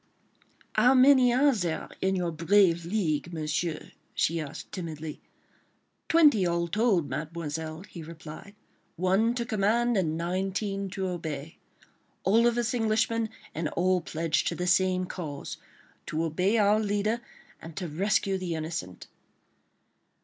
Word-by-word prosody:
"How 245 +5 +5
many 255 -1 +6
are 275 +3 +4
there 175 -8 -2
in 190 0 +1
your 175 -2 -1
brave 170 +1 +3
league, 170 -5 -1
Monsieur?" 155 0 -3 0.2
she 165 +1 +1
asked 150 -3 -7
timidly. 160 -4 -6 0.9
"Twenty 300 - +5
all 170 -1 0
told, 200 -5 +2
Mademoiselle," 160 +1 -5
he 185 -4 -10
replied, 165 +4 -10 0.4
"one 195 +7 +2
to 235 -1 -2
command, 235 +2 +1
and 160 -4 0
nineteen 195 +3 -2
to 190 0 -3
obey. 160 -4 -5 0.6
All 225 +5 +4
of 240 0 +1
us 240 0 0
Englishmen, 225 -1 +1 0.2
and 160 0 -2
all 180 +3 +1
pledged 165 0 -1
to - - -1
the 180 - -3
same 185 0 +2
cause—to 155 -1 -7
obey 180 +7 +1
our 210 0 +4
leader 210 +2 0 0.4
and 165 -1 -10
to 180 - -3
rescue 195 +4 0
the 175 -3 -3
innocent." 155 - -5
185 Hz, 130 wpm, -28 LUFS, 165-215 Hz, 0.9 s, many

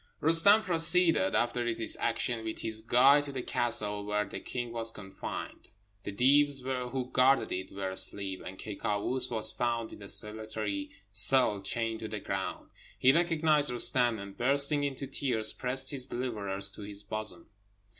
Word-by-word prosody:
Roostem 165 +7 +5
proceeded, 170 -1 +3
after 120 0 0
this - - 0
action, 120 -2 -1
with 110 0 -5
his 110 -1 -1
guide 135 +6 +4
to 140 - -7
the 130 -2 -5
castle 105 -4 0
where 105 0 -2
the 100 - -7
king 120 -2 -6
was 115 -1 0
confined. 95 -3 -8 0.4
The - - -4
Deevs 140 +4 +2 0.3
who 130 0 -5
guarded 130 -2 +2
it 95 +1 -4
were 95 -1 -5
asleep, 95 0 -1
and 95 +1 -9
Ky 105 -2 -7
Kâoos 110 +4 -2
was 110 -2 +3
found 120 -1 -3
in - - -13
a 100 - -5
solitary 105 -2 -3 0.2
cell, 105 +1 +4
chained 115 +3 -2
to 110 - -6
the 105 -1 -6
ground. 95 -1 -5 0.3
He 130 - +4
recognised 160 -3 +2
Roostem, 120 -1 +1
and 100 0 -10
bursting 140 +3 +3
into 140 -1 -4
tears, 130 -5 -1
pressed 130 +1 0
his 135 -3 +1
deliverer 110 -7 -4
to 100 +1 0
his 100 0 -7
bosom. 110 +1 -3
115 Hz, 165 wpm, -29 LUFS, 105-135 Hz, 0.4 s, Roostem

